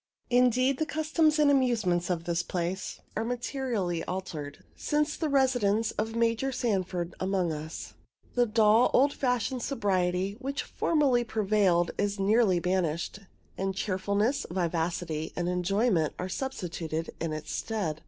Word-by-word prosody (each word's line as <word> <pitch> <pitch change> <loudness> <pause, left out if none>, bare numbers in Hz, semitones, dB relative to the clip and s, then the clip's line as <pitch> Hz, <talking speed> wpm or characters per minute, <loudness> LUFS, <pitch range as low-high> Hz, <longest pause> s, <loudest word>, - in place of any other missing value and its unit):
Indeed, 250 +2 +3
the 315 - +1
customs 310 0 +2
and 295 -2 +5
amusements 220 -10 +2
of 170 -2 -1
this 170 0 0
place 175 +2 -3 0.2
are 220 - 0
materially 235 - -2
altered 155 -6 -5
since 300 0 0
the 315 - -2
residence 245 -6 +2
of 220 +1 -3
Major 230 +3 +1
Sanford 185 -8 -1
among 185 -3 0
us. 155 +1 -7 0.4
The 245 -1 +3
dull, 220 +1 +4
old 280 +2 +4
fashioned 250 -1 -1
sobriety 190 -5 0
which 275 +1 -3
formerly 280 -7 +2
prevailed 205 -6 +2
is 205 0 0
nearly 200 -2 +3
banished, 180 0 -1 0.4
and 195 0 -1
cheerfulness, 200 +6 0
vivacity, 170 -2 -2
and 175 -1 -1
enjoyment 180 -1 +1
are 180 - -4
substituted 175 - -4
in 165 -1 -2
its 155 0 -5
stead. 195 -9 -2
200 Hz, 135 wpm, -29 LUFS, 175-245 Hz, 0.4 s, and